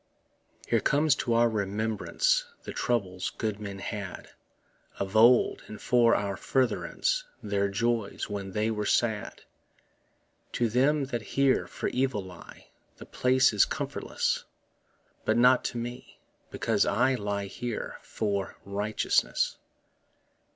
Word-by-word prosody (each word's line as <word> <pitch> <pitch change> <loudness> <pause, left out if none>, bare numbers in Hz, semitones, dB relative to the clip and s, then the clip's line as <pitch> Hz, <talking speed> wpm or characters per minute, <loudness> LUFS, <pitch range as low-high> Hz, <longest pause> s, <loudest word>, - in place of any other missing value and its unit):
Here - - +3
comes 150 +1 +3
to 120 -2 0
our 120 +1 +5
remembrance 110 - 0 0.2
The - - -7
troubles 95 -6 -1
good 110 -2 -2
men 100 -2 -6
had 100 -1 -6 0.7
Of 95 +1 -4
old, 120 +3 +5
and 110 - -9
for 120 -2 +4
our 100 -1 -1
furtherance 135 - 0 0.2
Their 100 -1 0
joys 115 +1 -1
when 100 -2 -5
they 105 +2 0
were 105 -2 -2
sad. 110 -3 0 1.1
To 120 -1 +1
them 140 +6 +2
that 120 - 0
here 135 +4 +1
for - - -4
evil 125 -6 0
lie 90 -2 -13 0.3
The - - -10
place 130 -1 +3
is 105 - +5
comfortless, - - -2 0.8
But 110 - +1
not 125 +1 +5
to 120 - -2
me, 120 +1 -7 0.3
because - - -1
that - - +3
I 135 +1 +3
Lie 100 -4 -2
here 115 +3 -5
for 100 -3 -3
righteousness. 105 +2 0
110 Hz, 130 wpm, -28 LUFS, 100-125 Hz, 1.1 s, our